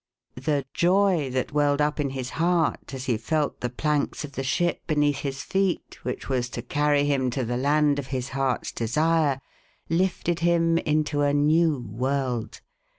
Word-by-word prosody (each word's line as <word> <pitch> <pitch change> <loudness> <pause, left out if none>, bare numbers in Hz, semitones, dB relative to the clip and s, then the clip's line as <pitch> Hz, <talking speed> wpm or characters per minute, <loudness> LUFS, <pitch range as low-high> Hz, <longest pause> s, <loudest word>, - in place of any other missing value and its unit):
The 140 -1 0
joy 180 -4 +3
that 130 +3 -2
welled 145 -1 +2
up 150 +1 +1
in 145 -2 0
his 130 -2 -5
heart 170 -2 0
as 130 -1 -6
he 120 -4 +1
felt 150 +6 -1
the 125 - -1
planks 150 +4 -1
of 145 - -11
the 135 - -4
ship 175 +6 0
beneath 145 -3 +2
his 135 -1 -4
feet, 195 -2 -1
which 125 +1 -4
was 125 -2 -1
to 120 - -4
carry 145 +2 +2
him 135 -3 +1
to 125 0 -2
the 120 +2 -2
land 145 +2 +2
of 135 - -5
his 130 -2 -3
heart's 135 -2 -1
desire, 150 +4 +1 0.5
lifted 175 0 0
him 165 -1 +3
into 150 -1 0
a 145 0 +2
new 155 +1 +3
world. 120 0 -2
145 Hz, 170 wpm, -25 LUFS, 130-155 Hz, 0.5 s, joy